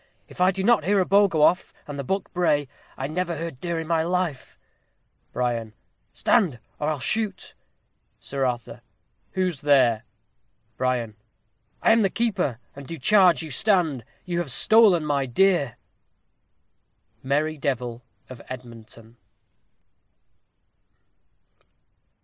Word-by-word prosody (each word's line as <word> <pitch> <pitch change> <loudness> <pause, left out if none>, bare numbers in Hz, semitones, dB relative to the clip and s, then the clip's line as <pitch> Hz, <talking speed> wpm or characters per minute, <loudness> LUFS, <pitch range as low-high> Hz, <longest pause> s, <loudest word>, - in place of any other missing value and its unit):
if - - -9
I 185 - +5
do 190 0 -2
not 230 -5 +4
hear 200 +4 +2
a 185 - +2
bow 200 +2 +5
go 160 -5 +1
off, 180 +4 +2
and 145 -1 -7
the - - -3
buck 195 +9 -3
bray, 150 -5 +1 0.3
I 130 - -3
never 170 +3 -2
heard 165 -5 -6
deer 170 -2 -2
in 165 - -4
my 165 0 +1
life. 170 -5 -2 0.7
Bri. 115 -3 -2 0.4
Stand, 170 - +1 0.2
or 150 - -1
I'll 155 - -1
shoot. 210 - -2 0.7
Sir 135 -1 -4
Arthur. 120 -2 -3 0.5
Who's 185 -6 -1
there? 130 -6 +3 0.7
Bri. 130 - -1
I 120 -4 -1 0.8
am 225 0 +5
the 195 - +3
keeper, 200 - -1 0.2
and 140 -1 -10
do 165 - -6
charge 180 +2 +4
you 155 - -8
stand. 165 - +1 0.2
You 175 -1 -2
have 170 -5 -3
stolen 205 - +4
my 140 -2 0
deer. 140 -4 +2 1.5
_Merry 150 +3 -1
Devil 125 -3 -2 0.3
of 130 -2 -11
Edmonton. 115 -2 -11
155 Hz, 130 wpm, -24 LUFS, 130-185 Hz, 1.5 s, I